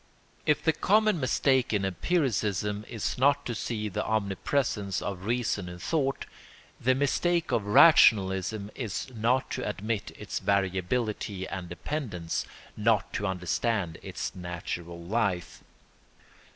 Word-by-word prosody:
] -, -, -34 dB
If 150 Hz, 0 st, +3 dB
the 160 Hz, -1 st, +3 dB
common 215 Hz, -1 st, +3 dB
mistake 130 Hz, -1 st, +2 dB
in 100 Hz, -2 st, +1 dB
empiricism 105 Hz, -, 0 dB
is 115 Hz, +1 st, -3 dB
not 140 Hz, +2 st, +3 dB
to 120 Hz, -, -2 dB
see 110 Hz, -1 st, -3 dB
the 100 Hz, -, -2 dB
omnipresence 100 Hz, -, -1 dB
of 95 Hz, -2 st, -5 dB
reason 115 Hz, -5 st, -1 dB
in 90 Hz, -, -8 dB
thought, 135 Hz, -, -1 dB, 0.5 s
the 130 Hz, +2 st, +3 dB
mistake 170 Hz, +5 st, +1 dB
of 105 Hz, -3 st, 0 dB
rationalism 105 Hz, -, +5 dB
is 115 Hz, +1 st, -4 dB
not 120 Hz, +4 st, +1 dB
to 125 Hz, -, -2 dB
admit 105 Hz, +1 st, -3 dB
its -, -, -4 dB
variability 100 Hz, +1 st, -1 dB
and 95 Hz, -3 st, -6 dB
dependence, 90 Hz, -, -3 dB, 0.3 s
not 110 Hz, 0 st, +1 dB
to 100 Hz, -, -1 dB
understand 90 Hz, 0 st, -1 dB
its -, -, -5 dB
natural 85 Hz, -1 st, -5 dB
life. 95 Hz, 0 st, -2 dB
105 Hz, 125 wpm, -28 LUFS, 95-130 Hz, 0.5 s, rationalism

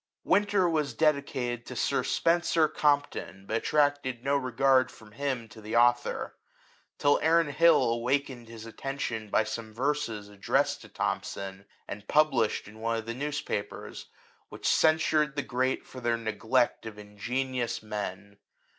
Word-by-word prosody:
" -, -, -64 dB
Winter'' 205 Hz, -3 st, +3 dB
was 150 Hz, -7 st, 0 dB
dedicated 135 Hz, -5 st, 0 dB
to -, -, -7 dB
Sir -, -, +1 dB
Spencer 165 Hz, -1 st, +2 dB
Compton, 145 Hz, -, 0 dB
but 110 Hz, -, -1 dB
attracted 145 Hz, -3 st, +1 dB
no 140 Hz, +1 st, +1 dB
regard 130 Hz, 0 st, +3 dB
from 110 Hz, -4 st, -16 dB
him 130 Hz, -1 st, -3 dB
to 110 Hz, 0 st, -13 dB
the 110 Hz, +2 st, -5 dB
author; 120 Hz, +1 st, +2 dB, 0.6 s
till 145 Hz, 0 st, +3 dB
Aaron 165 Hz, 0 st, +3 dB
Hill 165 Hz, 0 st, +5 dB
awakened 120 Hz, +1 st, -1 dB
his 115 Hz, -1 st, -9 dB
attention 115 Hz, -2 st, -4 dB
by 110 Hz, -, +3 dB
some 110 Hz, +1 st, -6 dB
verses 125 Hz, -6 st, -1 dB
addressed 100 Hz, -1 st, 0 dB
to -, -, -13 dB
Thom -, -, -1 dB
son, 95 Hz, 0 st, -7 dB, 0.2 s
and 105 Hz, 0 st, -8 dB
published 150 Hz, -10 st, +2 dB
in 105 Hz, +1 st, -13 dB
one 115 Hz, +1 st, -1 dB
of 110 Hz, -, -5 dB
the 115 Hz, -, -4 dB
newspapers, 140 Hz, -6 st, -4 dB, 0.4 s
which -, -, -5 dB
censured 155 Hz, -2 st, +3 dB
the 145 Hz, -, -1 dB
great 130 Hz, +1 st, -1 dB
for 130 Hz, -, -10 dB
their 120 Hz, -1 st, +1 dB
neglect 115 Hz, +2 st, 0 dB
of 105 Hz, -1 st, -8 dB
ingenious 120 Hz, +4 st, -3 dB
men. 100 Hz, -1 st, -6 dB
125 Hz, 150 wpm, -29 LUFS, 110-145 Hz, 0.6 s, Hill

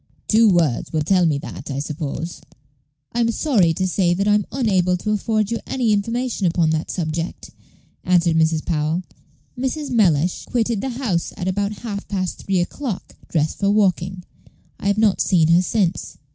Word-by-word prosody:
Two 225 Hz, 0 st, +5 dB
words 165 Hz, -10 st, +1 dB
will 155 Hz, -2 st, 0 dB
tell 180 Hz, +1 st, +3 dB
me 150 Hz, -3 st, +1 dB
that, 140 Hz, -, -8 dB
I 135 Hz, -, -3 dB
suppose." 150 Hz, +2 st, -4 dB, 0.7 s
"I 240 Hz, -, -2 dB
am 230 Hz, -1 st, +3 dB
sorry 230 Hz, -, +2 dB
to 185 Hz, -, 0 dB
say 180 Hz, -1 st, +1 dB
that 200 Hz, +3 st, 0 dB
I 210 Hz, -, +5 dB
am 210 Hz, -1 st, +1 dB
unable 190 Hz, -8 st, +1 dB
to 210 Hz, +4 st, -3 dB
afford 215 Hz, 0 st, 0 dB
you 230 Hz, -, -1 dB
any 240 Hz, -5 st, +1 dB
information 230 Hz, 0 st, -1 dB
upon 165 Hz, -2 st, +2 dB
that 160 Hz, 0 st, -2 dB
subject," 165 Hz, -1 st, -4 dB, 0.5 s
answered 175 Hz, -2 st, +3 dB
Mrs. 160 Hz, -1 st, +2 dB
Powell; 160 Hz, +2 st, -1 dB, 0.5 s
"Mrs. 265 Hz, +3 st, -3 dB
Mellish 180 Hz, -, +2 dB
quitted 230 Hz, -3 st, 0 dB
the 265 Hz, -, -2 dB
house 235 Hz, -9 st, -2 dB
at 180 Hz, -, -3 dB
about 200 Hz, +2 st, -1 dB
half 205 Hz, -3 st, -5 dB
past 185 Hz, -3 st, -3 dB
three 190 Hz, -2 st, 0 dB
o'clock, 215 Hz, +3 st, -5 dB
dressed 155 Hz, -2 st, -1 dB
for 200 Hz, -, +2 dB
walking. 190 Hz, -3 st, +1 dB, 0.6 s
I -, -, -3 dB
have 200 Hz, 0 st, +2 dB
not 215 Hz, -3 st, +3 dB
seen 165 Hz, -4 st, +3 dB
her 170 Hz, +2 st, +6 dB
since." 185 Hz, -2 st, -1 dB
185 Hz, 175 wpm, -21 LUFS, 170-215 Hz, 0.7 s, her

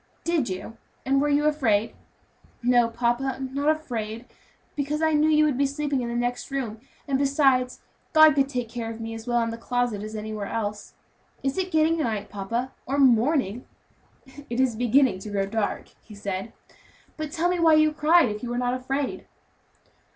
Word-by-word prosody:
"Did 330 Hz, -8 st, 0 dB
you? 190 Hz, +5 st, -6 dB, 0.3 s
and 275 Hz, +1 st, +2 dB
were 295 Hz, -, +1 dB
you 290 Hz, +1 st, +2 dB
afraid?" 230 Hz, -8 st, +1 dB, 0.7 s
"No, 245 Hz, -1 st, +4 dB
papa, 240 Hz, +3 st, -1 dB
not 275 Hz, +3 st, -1 dB
afraid, 235 Hz, -7 st, -3 dB, 0.5 s
because 290 Hz, +1 st, -2 dB
I 320 Hz, 0 st, +2 dB
know 300 Hz, +1 st, +3 dB
you 305 Hz, 0 st, +4 dB
would 280 Hz, -4 st, 0 dB
be 280 Hz, -, +3 dB
sleeping 285 Hz, -1 st, -2 dB
in 240 Hz, -, -3 dB
the 235 Hz, -, -3 dB
next 245 Hz, +2 st, -2 dB
room; 250 Hz, -6 st, -3 dB, 0.3 s
and 270 Hz, -1 st, +1 dB
besides, 270 Hz, -3 st, +2 dB, 0.3 s
God 310 Hz, -1 st, +7 dB
could 270 Hz, -1 st, +1 dB
take 250 Hz, -4 st, -3 dB
care 230 Hz, 0 st, -5 dB
of 225 Hz, 0 st, -7 dB
me 225 Hz, 0 st, -5 dB
as 225 Hz, +1 st, -9 dB
well 240 Hz, 0 st, +2 dB
in 230 Hz, -, -2 dB
the 230 Hz, -, -7 dB
closet 245 Hz, -3 st, -1 dB
as 215 Hz, +1 st, -7 dB
anywhere 215 Hz, -1 st, -5 dB
else. 210 Hz, -2 st, -4 dB, 0.5 s
Is 270 Hz, 0 st, 0 dB
it 370 Hz, 0 st, -1 dB
getting 320 Hz, 0 st, +2 dB
night, 220 Hz, -8 st, -2 dB
papa, 230 Hz, +6 st, -3 dB, 0.2 s
or 275 Hz, +2 st, -1 dB
morning?" 250 Hz, -3 st, +2 dB, 0.8 s
"It 240 Hz, +1 st, -3 dB
is 260 Hz, -3 st, +2 dB
beginning 245 Hz, -1 st, +3 dB
to 210 Hz, -, -8 dB
grow 200 Hz, -1 st, 0 dB
dark," 210 Hz, +1 st, -2 dB
he 210 Hz, -, -13 dB
said. 200 Hz, +1 st, -4 dB, 0.6 s
"But 310 Hz, -2 st, -5 dB
tell 345 Hz, +2 st, 0 dB
me 360 Hz, 0 st, 0 dB
why 325 Hz, -2 st, +6 dB
you 310 Hz, 0 st, +4 dB
cried, 305 Hz, -1 st, +4 dB
if 210 Hz, 0 st, -5 dB
you 245 Hz, -, -5 dB
were 240 Hz, -, -2 dB
not 245 Hz, 0 st, 0 dB
afraid." 270 Hz, +2 st, -3 dB
250 Hz, 190 wpm, -25 LUFS, 225-290 Hz, 0.8 s, God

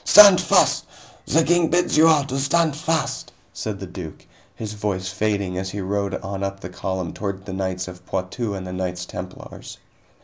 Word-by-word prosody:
"Stand 200 Hz, -3 st, +9 dB
fast. -, -, +3 dB, 0.4 s
The 165 Hz, +2 st, +4 dB
King 175 Hz, 0 st, +3 dB
bids 175 Hz, +2 st, +2 dB
you 160 Hz, +1 st, +7 dB
all 155 Hz, -3 st, +5 dB
to 135 Hz, 0 st, -3 dB
stand 150 Hz, +2 st, +2 dB
fast," 160 Hz, +1 st, -1 dB, 0.2 s
said 105 Hz, -3 st, -4 dB
the 95 Hz, -, -5 dB
duke, 90 Hz, -3 st, -9 dB, 0.3 s
his 110 Hz, -1 st, -5 dB
voice 100 Hz, -3 st, -2 dB
fading 100 Hz, -2 st, -1 dB
as 95 Hz, 0 st, -3 dB
he 100 Hz, -, -5 dB
rode 100 Hz, +1 st, -1 dB
on 100 Hz, 0 st, -5 dB
up 100 Hz, 0 st, -3 dB
the 90 Hz, -, -6 dB
column 90 Hz, -2 st, -4 dB
toward 100 Hz, -2 st, -5 dB
the 95 Hz, -, -6 dB
knights 95 Hz, -1 st, -2 dB
of 90 Hz, 0 st, -10 dB
Poitou 100 Hz, +3 st, -3 dB
and 95 Hz, -1 st, -5 dB
the 90 Hz, -, -6 dB
Knights 90 Hz, -1 st, -3 dB
Templars. 90 Hz, +1 st, -9 dB
100 Hz, 190 wpm, -22 LUFS, 95-135 Hz, 0.4 s, Stand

